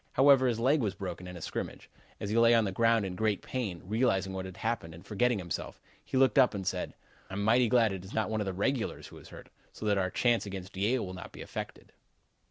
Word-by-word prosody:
However, 135 -1 +6
his 115 -2 0
leg 135 +5 +3
was 100 -4 -1
broken 90 -2 -6
in 90 0 -8
a - - -10
scrimmage. - - -5 0.3
As 100 - -4
he - - 0
lay 115 0 +6
on 115 - +4
the 95 - -1
ground 115 +1 +3
in 95 - -4
great 105 +1 0
pain, 105 -10 -4
realizing 100 -3 +1
what 95 0 -4
had 95 0 -9
happened 110 -8 -3
and 85 +3 -14
forgetting 115 +3 +1
himself, 85 -4 -5 0.2
he - - -2
looked 130 -1 +5
up 125 -4 +5
and 95 -1 -4
said: 90 -1 -2 0.3
"'I'm 100 +2 -3
mighty 115 +2 +4
glad 115 -3 +4
it 95 -2 -6
is 95 - -11
not 110 - 0
one 110 -1 0
of - - -1
the - - 0
regulars 115 +5 -1
who - - -12
is - - -14
hurt, - - -12 0.2
so - - -8
that 100 -2 +2
our 95 -1 0
chance 120 +2 +1
against 95 -1 -7
Yale 110 +5 +1
will 90 - -7
not 90 - -9
be - - -9
affected.'" - - -7
105 Hz, 250 wpm, -30 LUFS, 95-120 Hz, 0.3 s, However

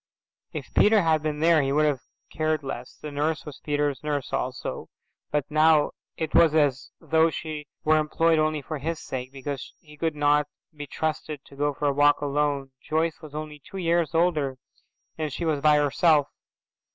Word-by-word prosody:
If - - -7
Peter 210 -2 +5
had 160 -2 +3
been 150 -1 -3
there 165 -1 +5
he 135 0 0
would 150 +2 +3
have 145 -3 +1 0.3
cared 155 -1 0
less; 125 -2 -6
the 150 - -7
nurse 150 +2 -1
was 150 -3 -9
Peter's 145 -1 -1
nurse 145 -3 -3
also, - - -3 0.4
but 145 -2 0
now 155 0 +4 0.3
it 160 - -3
was 160 -2 +5
as 145 -4 +2
though 160 0 +3
she 155 -2 -6 0.2
were 155 0 +4
employed 160 +1 +2
only 155 -1 0
for 155 +2 -5
his 160 +3 -3
sake, 130 0 -6
because 135 0 -6
he 150 -3 -16
could 160 0 -1
not 145 0 +3 0.3
be 145 -1 -7
trusted 155 -1 -3
to 140 - -15
go 145 0 0
for 150 - -3
a 140 - +3
walk 145 +1 +4
alone. 145 -1 -1
Joyce 160 +1 -1
was 150 -2 -11
only 150 -1 -6
two 195 0 -9
years 170 -3 +1
older 155 -6 +1 0.6
and 155 -2 -2
she 170 - -4
was 155 -3 0
by 150 0 +5
herself. 145 +1 +3
150 Hz, 185 wpm, -26 LUFS, 145-160 Hz, 0.6 s, Peter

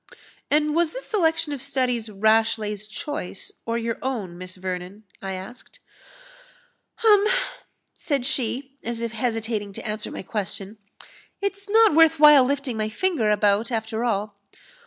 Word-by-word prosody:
"And 300 +1 +2
was 335 0 +2
this - - -7
selection 325 -7 +1
of 275 - -4
studies 255 -5 0
Rashleigh's 215 0 +1
choice, 290 - -5 0.2
or 230 0 0
your 230 -1 -3
own, 220 -10 -3
Miss 185 +1 -7
Vernon?" 185 +2 -6 0.2
I 195 0 -4
asked. 190 +7 -9 1.3
"Um!" 415 -2 +6 0.7
said 280 -6 -1
she, 270 +1 -1
as 235 0 -3
if 230 -1 -2
hesitating 225 -3 -2
to - - -6
answer 210 0 -3
my - - -7
question, 200 +1 -5 0.6
"It's 400 0 -4
not 445 -3 +6
worth 320 0 +5
while 300 -3 +9
lifting 270 -2 -1
my 215 0 -1
finger 285 - 0
about, 210 +2 +2
after 220 0 -2
all. 205 -3 -2
230 Hz, 140 wpm, -24 LUFS, 210-290 Hz, 1.3 s, while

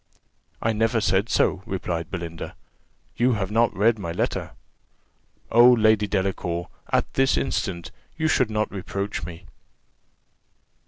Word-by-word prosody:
"I 110 - +2
never 115 +2 +1
said 100 +1 +1
so," 95 - +2
replied 90 -4 -3
Belinda: 85 -3 -6 0.6
"you 125 +2 +3
have 100 -3 -2
not 115 +1 +3
read 110 +2 +3
my 85 -4 -4
letter. - - -2 1.0
Oh, 120 +2 +8
Lady 110 -2 +3
Delacour, 95 -3 -2 0.2
at - - +1
this 135 0 +2
instant 95 -9 -2 0.3
you 160 -1 +1
should 130 -7 +2
not 110 0 -1
reproach 100 +1 -4
me." 85 +1 -10
105 Hz, 125 wpm, -24 LUFS, 90-115 Hz, 1.0 s, Oh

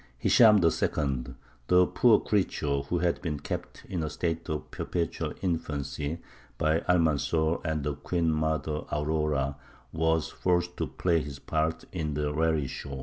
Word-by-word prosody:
Hishām 110 -3 +7
II., 70 -5 0 0.3
the 90 0 +6
poor 115 +1 +4
creature 75 -8 0
who 70 +6 -2
had 85 -1 0
been 75 -5 -3
kept - - -6
in 90 -3 -3
a 80 - -2
state 85 +2 -3
of 75 -1 -4
perpetual 85 -2 -3
infancy 75 -2 -2 0.3
by 80 +1 +2
Almanzor 80 -1 +2
and 80 -2 -1
the 75 +1 -1
queen 85 +3 0
mother 80 -1 -1
Aurora, 75 -2 0 0.4
was 80 0 +1
forced 90 -1 0
to - - -1
play 85 -2 +1
his 70 -1 -7
part 80 +2 -1
in 75 -5 -3
the 75 0 -1
raree 80 -2 +1
show. 70 +1 -6
80 Hz, 145 wpm, -28 LUFS, 75-85 Hz, 0.4 s, Hishām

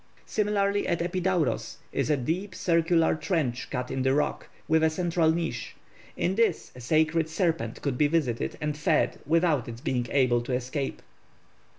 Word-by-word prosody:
Similarly 205 -1 0
at 170 - +1
Epidauros 180 -2 -1
is - - -1
a 150 - +3
deep 170 +10 -3
circular 165 -1 +2
trench 155 -6 -1
cut 125 -2 -3
in 130 0 -1
the 130 +1 +2
rock, 150 - -1 0.2
with 160 0 +3
a 160 - +5
central 170 0 +1
niche; 160 -8 -2 0.4
in 180 - +1
this 220 -4 +1
a - - -10
sacred 160 +4 +2
serpent 165 - -1
could 135 -4 -1
be 150 - +5
visited 145 -7 -1
and 150 -1 -2
fed 155 +1 +1
without 160 -5 +2
its 115 0 -7
being 125 -3 -1
able 125 -3 +3
to 125 +2 -4
escape. 130 +3 -3
155 Hz, 165 wpm, -27 LUFS, 130-170 Hz, 0.4 s, a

